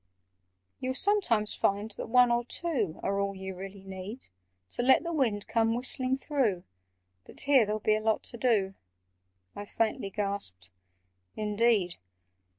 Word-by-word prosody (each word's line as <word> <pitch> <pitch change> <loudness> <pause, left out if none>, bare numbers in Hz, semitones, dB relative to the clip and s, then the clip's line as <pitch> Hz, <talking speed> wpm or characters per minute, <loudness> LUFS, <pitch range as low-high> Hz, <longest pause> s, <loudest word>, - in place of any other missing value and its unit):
"You'll 260 0 -2
sometimes 260 - +2
find 205 +2 0
that - - -6
one 250 0 +5
or 235 0 +2
two 240 - 0
Are 200 0 0
all 200 0 -1
you 190 0 -6
really 195 +1 -9
need 195 +5 -8 0.4
To - - 0
let 260 +5 +5
the 340 0 -3
wind 230 -9 0
come 225 0 +1
whistling 255 +1 0
through— 255 - 0 0.6
But - - -8
here 275 -6 +4
there'll 215 +1 -1
be 215 - +3
a 215 - -2
lot 220 0 +1
to 235 - -6
do!" 215 -6 +1 0.8
I 205 - -6
faintly 220 -3 -1
gasped 195 - -3 0.6
"Indeed! 210 -3 +1
215 Hz, 150 wpm, -29 LUFS, 195-250 Hz, 0.8 s, one